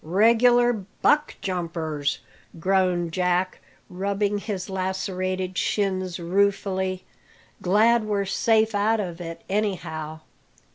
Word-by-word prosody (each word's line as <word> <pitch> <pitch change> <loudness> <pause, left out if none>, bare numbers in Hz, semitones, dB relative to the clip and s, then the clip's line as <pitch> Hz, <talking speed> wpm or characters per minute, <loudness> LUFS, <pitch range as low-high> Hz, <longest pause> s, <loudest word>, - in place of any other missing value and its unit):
"Regular 235 +7 +4 0.3
buck 300 0 +3
jumpers!" 165 -5 -2 0.4
groaned 180 -2 +1
Jack, 180 +1 0 0.3
rubbing 200 +2 -1
his 200 -3 -4
lacerated 185 -1 -2
shins 185 -3 -1
ruefully. 190 +1 0 0.6
"Glad 220 +5 +4
we're 205 -2 0
safe 220 +3 +2
out 215 +2 +2
of 175 -4 -4
it, 165 -1 -7
anyhow." 160 -6 -3
190 Hz, 95 wpm, -24 LUFS, 180-205 Hz, 0.6 s, Regular